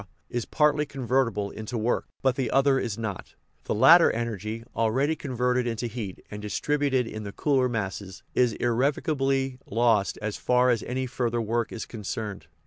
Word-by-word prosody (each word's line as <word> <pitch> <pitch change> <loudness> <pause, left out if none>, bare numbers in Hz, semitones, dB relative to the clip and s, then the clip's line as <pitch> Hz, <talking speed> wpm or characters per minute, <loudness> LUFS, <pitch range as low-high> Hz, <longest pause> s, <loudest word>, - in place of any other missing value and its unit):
is 120 -2 -2
partly 150 -1 +2
convertible 125 -7 -1
into 110 +2 -5
work, 115 +2 0 0.2
but 130 -1 +3
the 130 - -1
other 135 0 +3
is 115 -4 -3
not; 110 -4 -5 0.3
the - - -1
latter - - +8
energy, 115 -1 -3
already 130 +8 +1
converted 125 -3 0
into 115 0 -2
heat 110 -5 -6
and 105 0 -6
distributed 135 +4 0
in 110 -1 -6
the 100 -1 -6
cooler 130 +1 +1
masses, 100 -4 -4
is 125 -3 +3
irrevo 125 +4 +1
cably 135 -3 0
lost 115 -2 +2
as 110 -1 -3
far 125 0 +3
as 115 -3 +1
any 130 +1 -2
further 120 -2 -1
work 115 +1 -1
is 115 - -5
concerned. 105 -5 -5
120 Hz, 165 wpm, -26 LUFS, 110-130 Hz, 0.3 s, latter